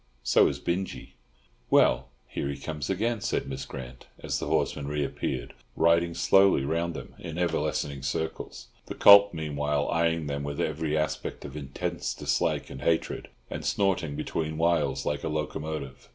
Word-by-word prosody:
So 60 - +5
is - - -2
Binjie." 90 -2 -3 0.6
"Well, 65 +2 +4 0.2
here 70 - -3
he 70 - -4
comes 75 0 -5
again," 110 +3 0
said - - -1
Miss 70 0 -5
Grant, 60 -2 -9
as - - -2
the - - -4
horseman 70 -2 0
reappeared, 70 -3 -2 0.2
riding 85 +1 +3
slowly 95 -3 +4
round 85 +2 -1
them - - -8
in 85 -2 -6
ever 85 -2 +1
lessening 70 -2 -2
circles; 70 -3 -4 0.2
the - - -5
colt 100 0 +9
meanwhile 75 -2 -1
eyeing 85 -1 +1
them 70 -1 -3
with 70 0 -4
every 80 0 0
aspect 75 0 -2
of - - -8
intense 70 -3 -3
dislike - - 0
and 65 - -8
hatred, 80 -1 0 0.2
and - - -6
snorting 95 -7 +1
between 80 0 -3
whiles 80 -4 +1
like 75 - -1
a - - -1
locomotive. 75 -2 -4
75 Hz, 160 wpm, -28 LUFS, 70-85 Hz, 0.6 s, colt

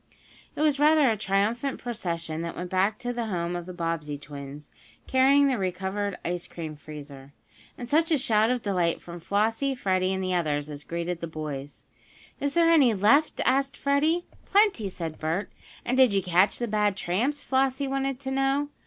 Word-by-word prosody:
It - - -3
was 300 -2 +2
rather 300 -3 +5
a - - +1
triumphant 215 +7 0
procession 170 -9 -3
that 170 0 -5
went 180 0 -6
back 190 +3 +1
to 245 0 -3
the 240 -2 -3
home 175 -3 -2
of 175 0 -5
the - - -6
Bobbsey 165 -4 -3
twins, 140 0 -10 0.3
carrying 275 +2 +4
the 260 -5 0
recovered 190 +2 -2
ice 175 0 -3
cream 160 -3 -7
freezer. 145 -2 -11 0.4
And 245 - -6
such 320 +5 +2
a 315 - +3
shout 220 -4 +2
of 250 -2 -1
delight 180 -5 0
from 175 0 -9
Flossie, 225 +9 0
Freddie 185 -5 0
and 190 0 -2
the 185 0 -1
others 150 -4 -1
as 145 0 -7
greeted 170 0 -4
the 170 - -3
boys! 150 -3 -6 0.6
"Is 285 +1 -2
there 335 -1 +5
any 270 -9 +5
left?" 225 +11 +3
asked 270 +1 +1
Freddie. 305 +5 +1 0.2
"Plenty," 395 - +2
said 165 -4 -6
Bert. 165 +6 -2 0.3
"And 250 +2 0
did 255 -5 +6
you 195 -1 +1
catch 180 +3 +3
the 240 - -2
bad 210 -2 +1
tramps?" 245 +12 -1
Flossie 270 +1 +1
wanted 270 -1 -1
to 265 -1 -4
know. 270 +2 +1
200 Hz, 185 wpm, -26 LUFS, 170-270 Hz, 0.6 s, did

